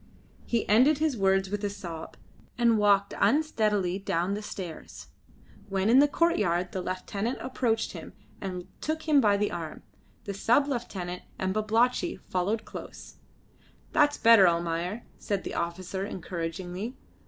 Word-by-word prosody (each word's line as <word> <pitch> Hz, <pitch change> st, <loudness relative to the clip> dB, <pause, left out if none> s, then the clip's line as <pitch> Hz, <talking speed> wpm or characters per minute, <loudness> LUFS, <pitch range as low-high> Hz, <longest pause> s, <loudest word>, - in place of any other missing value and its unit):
He 235 Hz, -2 st, 0 dB
ended 255 Hz, +8 st, +5 dB
his 310 Hz, -2 st, +1 dB
words 195 Hz, -2 st, +2 dB
with 205 Hz, 0 st, -3 dB
a 205 Hz, -, 0 dB
sob, 175 Hz, -5 st, -8 dB, 0.4 s
and 235 Hz, -3 st, +4 dB
walked 200 Hz, -1 st, +3 dB
unsteadily 210 Hz, -, +2 dB
down 185 Hz, -1 st, -1 dB
the 210 Hz, -, -3 dB
stairs. 185 Hz, -6 st, -8 dB, 0.6 s
When 195 Hz, +2 st, +1 dB
in 255 Hz, -, +7 dB
the 290 Hz, -, +6 dB
courtyard 185 Hz, -, +1 dB
the 185 Hz, -, -3 dB
lieutenant 200 Hz, +6 st, -3 dB
approached 240 Hz, -3 st, -1 dB
him, -, -, -9 dB, 0.3 s
and 185 Hz, -2 st, -5 dB
took 315 Hz, +1 st, -2 dB
him 295 Hz, -3 st, +5 dB
by 205 Hz, -3 st, +4 dB
the 210 Hz, 0 st, 0 dB
arm. 165 Hz, -3 st, -6 dB, 0.4 s
The 200 Hz, -, -4 dB
sub 240 Hz, +8 st, +3 dB
lieutenant 190 Hz, -9 st, -4 dB, 0.2 s
and 190 Hz, 0 st, -1 dB
Babalatchi 230 Hz, -, +1 dB, 0.2 s
followed 200 Hz, +5 st, 0 dB
close. -, -, -10 dB, 0.7 s
"That's 290 Hz, 0 st, +3 dB
better, 225 Hz, -5 st, +7 dB
Almayer," 170 Hz, +5 st, -1 dB, 0.2 s
said 200 Hz, -3 st, -2 dB
the -, -, -5 dB
officer 180 Hz, +3 st, -3 dB
encouragingly. 180 Hz, +4 st, -5 dB
200 Hz, 140 wpm, -28 LUFS, 180-235 Hz, 0.7 s, in